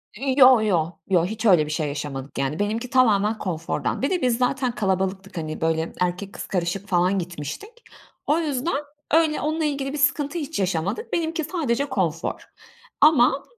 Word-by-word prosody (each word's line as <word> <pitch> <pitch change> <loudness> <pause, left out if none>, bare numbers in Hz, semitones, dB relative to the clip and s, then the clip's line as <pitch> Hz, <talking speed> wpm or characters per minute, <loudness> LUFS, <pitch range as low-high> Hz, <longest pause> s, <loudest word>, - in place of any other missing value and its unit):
I 260 +3 -1
yo 255 -4 +8
yo, 175 -5 0
yo. 175 -2 +3
Hiç 220 +3 -5
öyle 175 -7 +5
bir 150 - -6
şey 155 -1 -1
yaşamadık 140 -1 -6
yani 135 +5 -1
benimki 225 +4 -2
tamamen 220 -4 +3
konfordan. 165 +1 -3
Bir 275 - +1
de 365 -2 0
biz 245 -2 +2
zaten 255 0 0
kalabalıktık, 190 -1 -2
hani, 155 -1 -5
böyle 160 0 0
erkek 180 +2 -2
kız - - -7
karışık 185 +2 -2
falan 185 +1 +2
gitmiştik. 170 - -6 0.6
O 305 +3 +3
yüzden 285 -1 -1 0.3
öyle 315 -1 +3
onunla 310 +1 -1
ilgili 280 -1 -2
bir - - -3
sıkıntı 290 +3 +1
hiç 295 -4 -4
yaşamadık. 190 - -2
Benimki 325 -1 -1
sadece 285 -5 -1
konfor 170 - -2 0.6
ama 275 -3 +5
215 Hz, 170 wpm, -23 LUFS, 175-280 Hz, 0.6 s, yo